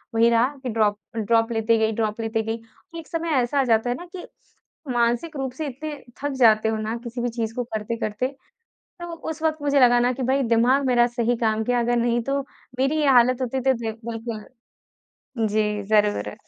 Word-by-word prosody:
वही 230 +1 +5
रहा 235 +2 +4 0.2
कि 255 - -3
ड्रॉप, 215 -2 +1 0.2
ड्रॉप 225 +1 +2
लेते 225 0 +2
गई 220 0 +1
ड्रॉप 215 0 -2
लेते 225 0 -1
गई। 225 +1 -4 0.4
एक 325 - -11
समय 330 0 -3
ऐसा 245 +4 0
आ - - +4
जाता 230 -1 +2
है 245 - 0
ना 350 - -9
कि 355 - -8 0.7
मानसिक 240 +7 0
रूप 265 -1 -3
से 305 +2 -4
इतने 295 +3 -6 0.3
थक 290 - 0
जाते 220 -2 +5
हो 220 - -1
ना 215 +2 -3
किसी 240 +1 -5
भी 245 - 0
चीज़ 225 -1 -3
को 245 - -1
करते-करते, 225 0 -3
तो 270 - -17 0.7
उस 320 0 -6
वक़्त 315 -1 +1
मुझे 285 -1 +2
लगा 245 -1 +6
ना 245 +1 +2
कि 255 +1 -4
भई 265 +2 +1
दिमाग 245 +4 +3
मेरा 240 -1 +4
सही 240 0 0
काम 220 -1 0
किया, 245 -1 +1
अगर 240 +1 +1
नहीं 235 0 +1
तो 275 +2 -1 0.4
मेरी 275 +4 +2
ये 290 - +2
हालत 255 0 +4
होती 260 +1 -1
तो 265 +1 +3
दे 230 -2 -3
बिल्कुल। 225 -1 -6 1.0
जी, 210 -1 0
ज़रूर। 205 - +1
235 Hz, 205 wpm, -23 LUFS, 225-260 Hz, 1.0 s, लगा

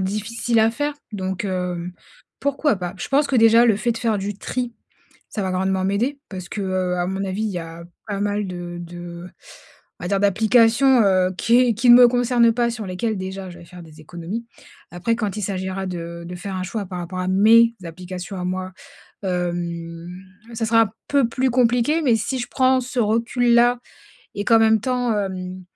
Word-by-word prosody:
difficile 220 +4 -1
à 220 - +4
faire 290 +5 -2 0.2
donc, 190 -1 -3
hem, 180 -2 -3 0.5
pourquoi 280 -3 +1
pas. 180 -1 -5
Je - - -6
pense 285 +2 +3
que 265 - 0
déjà 230 +1 +6
le 220 -4 +3
fait 235 +3 0
de 230 - -6
faire 225 -3 0
du 200 +1 -4
tri, 245 0 -3 0.6
ça 210 - -4
va 190 - -2
grandement 190 0 0
m'aider. 235 +9 0
Parce 185 -2 -8
que, 205 - -4
heu, 185 -1 -1
à 175 - -1
mon 190 +1 -3
avis 195 +3 -3
il 215 - -1
y 180 - -3
a 165 0 -9 0.2
pas 200 -2 -3
mal 205 0 -1
de 175 -1 -6
de 175 0 -9 0.7
on - - -6
va 175 - -3
dire 200 -1 +1
d'applications, 225 +5 +4
heu, 185 -2 +3
qui 235 +2 +4
est 245 -3 +3
qui 240 +3 +3
ne - - +11
me 245 -1 +8
concernent 245 -1 +3
pas, 240 0 +1
sur 220 -3 -6
lesquelles 205 +4 -2
déjà 190 0 -6
je 175 - -12
vais 170 - -13
faire 180 +1 -12
des 160 -1 -14
économies. 175 +9 -6 0.4
Après, 175 +7 -1
quand 215 -3 -3
il 210 - -4
s'agira 190 0 -3
de 170 -1 -6
de 180 - -7
faire 190 +2 -6
un 185 - -3
choix 200 +1 -4
par 180 -1 -6
rapport 180 +2 -6
à 185 - -2
mes 230 +5 +5
applications 180 +3 -7
à - - -4
moi, 185 +1 -3 0.5
hem, 170 -2 -3 0.4
ça 225 0 -2
sera 225 -2 +3 0.2
peu 280 -3 +3
plus 260 +2 0
compliqué, 245 +5 +2
mais 245 -5 +4
si 260 +4 -3
je 245 - -3
prends 260 0 +2
ce 250 0 -4
recul 235 +2 +1
là 240 +1 +4 0.6
et 205 - -3
qu'en 230 -2 +6
même 220 -1 +4
temps, 250 0 0
hem, 185 -2 -4
200 Hz, 205 wpm, -21 LUFS, 180-235 Hz, 0.7 s, ne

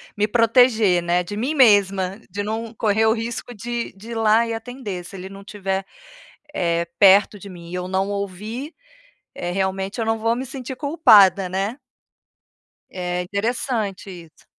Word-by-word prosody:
me 210 0 +1
proteger, 230 -4 +4
né, 175 +1 +1
de 205 +4 -7
mim 255 +9 -2
mesma, 200 -5 +3
de 205 0 -4
não 220 +2 -4
correr 220 0 +2
o 220 - +4
risco 235 +1 -5
de 235 +2 -4
de 215 +4 -12
ir - - -5
lá 225 +1 +3
e 230 - -3
atender, 225 -6 -6
se 180 - -11
ele 190 0 -8
não 195 0 -11
estiver, 195 -2 -3 0.7
eh, 170 - 0
perto 200 +1 +5
de 200 - -11
mim 170 -2 -11
e - - -7
eu 180 0 -4
não 190 +1 -1
ouvir, 210 - -5 0.6
eh, 175 0 -4
realmente 190 +3 -2
eu - - 0
não 225 0 0
vou 230 +1 +1
me 250 +2 -4
sentir 260 0 -7
culpada, 215 - +5
né? 195 +7 -3 1.1
É, 180 -1 -3
interessante 205 +1 -3 0.2
isso. 160 - -25
205 Hz, 170 wpm, -21 LUFS, 190-230 Hz, 1.1 s, perto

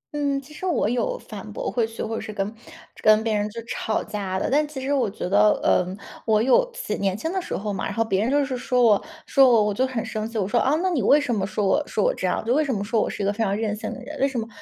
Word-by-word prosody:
嗯， 285 -1 0
其 295 +3 -14
实 370 +5 -5
我 340 - +1
有 370 - -1
反 - - -9
驳 - - -3
回 230 -3 +1
去 225 - -6
或 225 - -4
者 225 - -3
是 - - -6
跟 205 0 -3 0.5
跟 215 0 +5
别 225 -1 0
人 210 0 0
就 230 - -7
吵 220 -1 -2
架 200 -3 -3
的， - - -1
但 300 +2 +3
其 295 -2 -7
实 270 +2 -1
我 255 -6 +1
觉 195 - -5
得， 205 +3 +4
呃， 180 - +3 0.4
我 215 -1 +4
有 260 - +4
自 - - -4
己 - - -3
年 195 -1 0
轻 320 +9 -3
的 380 - -1
时 - - -4
候 205 +1 -3
嘛， 190 - -4
然 200 - -4
后 225 - +1
别 195 -3 0
人 225 - +1
就 285 +1 +2
是 265 -1 -3
说 250 0 +1
我 215 -4 +4 0.2
说 270 -2 +5
我， 225 -3 +5
我 210 0 0
就 260 +6 +1
很 245 -3 -3
生 220 -1 -4
气。 230 - -5
我 190 - 0
说： 235 +4 +2
“啊， 275 +3 +2
那 375 - +1
你 305 -8 +1
为 290 - +5
什 285 -5 -1
么 195 -3 -1
说 205 +1 -1
我 240 +10 +3
说 - - -1
我 - - +3
这 - - -2
样？ - - -1
就 235 - +2
为 305 +3 +3
什 280 - -2
么 200 - -2
说 220 +1 +1
我 - - 0
是 205 - -4
一 - - 0
个 200 - +1
非 225 +2 -1
常 200 -1 0
任 215 -1 -1
性 210 - -5
的 - - -7
人， 295 +3 -8
为 275 - +3
什 270 -3 -3
么 225 - -4
225 Hz, 345 characters per minute, -24 LUFS, 210-275 Hz, 0.5 s, 跟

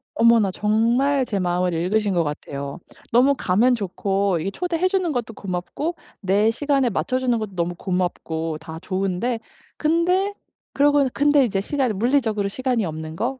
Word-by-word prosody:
어머나. 230 -4 +4
정말 235 +7 +2
제 205 -4 -2
마음을 180 0 0
읽으신 200 +5 0
것 170 -2 +2
같아요. 140 -2 -5 0.3
너무 255 +4 +5
가면 230 +8 +3
좋고 195 -2 -1
이게 185 +5 -3
초대해 355 - 0
주는 370 -3 0
것도 240 -4 -3
고맙고 195 - -4 0.3
내 205 +3 +3
시간에 275 0 +1
맞춰주는 255 +2 0
것도 210 -4 -6
너무 175 0 -1
고맙고 170 -3 -2
다 160 0 -8
좋은데 195 +5 -1 0.4
근데 360 +5 +1 0.4
그러고 285 -1 +4
근데 290 -1 +4
이제 195 -4 -1
시간이 260 0 -1
물리적으로 220 -2 +1
시간이 245 +1 -1
없는 160 -1 -6
거, 250 +7 -2
220 Hz, 340 characters per minute, -22 LUFS, 185-265 Hz, 0.4 s, 너무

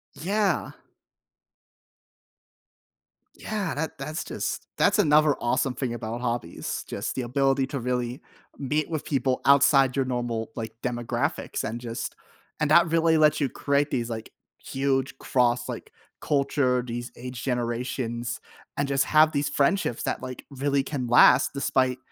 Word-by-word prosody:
Yeah. 200 +4 0 2.6
Yeah, 210 -3 -3
that 155 0 -4
that's 155 +3 -4
just - - -4
that's - - +3
another, 150 -1 +5
awesome 125 +2 0
thing 125 -3 -3
about 115 +1 -5
hobbies, 120 -8 -3
just, - - -4
the 130 - -2
ability 135 +2 +1
to 140 - -4
really 125 +1 -2 0.4
meet 150 +2 -1
with 155 -3 -3
people 135 -2 0
outside 140 -1 +5
your 135 - +2
normal, 120 -3 -3
like, 115 -1 -5
demographics, 120 -2 -2
and 120 +2 -4
just 115 -1 -5 0.4
and 150 0 +1
that 170 +2 +6
really 165 -1 +3
lets 155 0 +4
you 140 - +2
create 140 +2 0
these, 120 -1 -2
like, 110 -1 -6 0.3
huge 135 0 -1
cross, 120 -1 +1
like, - - -7 0.3
culture, 140 -3 +1
these 120 0 -5
age 125 0 -7
generations, 120 -1 -2 0.4
and 140 0 0
just 135 -1 +2
have 155 0 +5
these 140 0 0
friendships 140 -3 +1
that, - - -2
like, 130 -1 -7
really 140 0 0
can 135 -3 -4
last 125 +2 +6
despite 130 -2 +1
130 Hz, 140 wpm, -26 LUFS, 120-145 Hz, 2.6 s, that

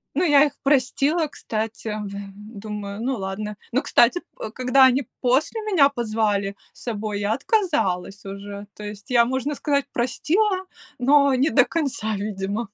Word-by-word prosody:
Ну, 340 - +2
я 295 -3 +6
их 285 - -3
простила, 290 +4 +2
кстати, 220 -4 -5 0.2
в 200 - -5 0.5
думаю, 210 -1 -6
ну 260 0 -1
ладно. 205 +2 -4 0.2
Но, 260 +4 +2
кстати, 245 +9 +4 0.2
п - - -6
э, - - -10
когда 255 +2 +4
они 260 +2 +1 0.2
после 270 - +1
меня 360 -10 +4
позвали 215 -5 -1 0.2
с - - -14
собой, 215 -3 -3
я 205 +2 0
отказалась 205 - 0
уже. 200 +1 -7
То 210 - -10
есть 210 +1 -8
я, 235 -1 +5
можно 260 +4 -2
сказать, 280 -1 0
простила, 370 - 0 0.3
но 280 +1 +4
не 275 +5 +2
до 265 -4 +5
конца, 255 -9 -2
видимо. 200 +2 -3
245 Hz, 160 wpm, -23 LUFS, 210-285 Hz, 0.5 s, я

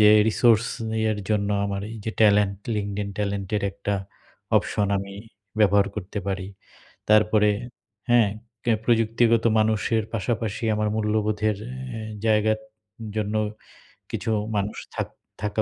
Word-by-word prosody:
যে, 105 - +8 0.2
রিসোর্স 115 0 +4 0.3
নিয়ের 110 -1 0
জন্য 105 -1 +1 0.2
আমার 100 -1 -2
এই 115 - -7
যে 110 - -1
ট্যালেন্ট 105 -2 +5 0.2
LinkedIn 100 0 -2
ট্যালেন্টের 100 0 -1
একটা 100 +1 -3 0.6
অপশন 105 - +1
আমি 100 0 -6 0.4
ব্যবহার 100 -1 +5
করতে 105 0 -5
পারি, 95 -1 -2 0.6
তারপরে 105 0 +5 0.6
হ্যাঁ, 120 -3 +5 0.4
ক্যা 115 -2 +3
প্রযুক্তিগত 115 0 +3
মানুষের 110 +1 +2
পাশাপাশি 115 +1 -2
আমার 105 0 0
মূল্যবোধের 105 -1 +1 0.4
এ - - -5 0.3
জায়গার 110 0 +3 0.6
জন্য 105 0 -1 0.8
কিছু 110 - -2 0.2
মানুষ 100 +1 -1 0.2
থাক - - -1 0.3
থাকা 105 +1 0
105 Hz, 120 wpm, -25 LUFS, 100-110 Hz, 0.8 s, যে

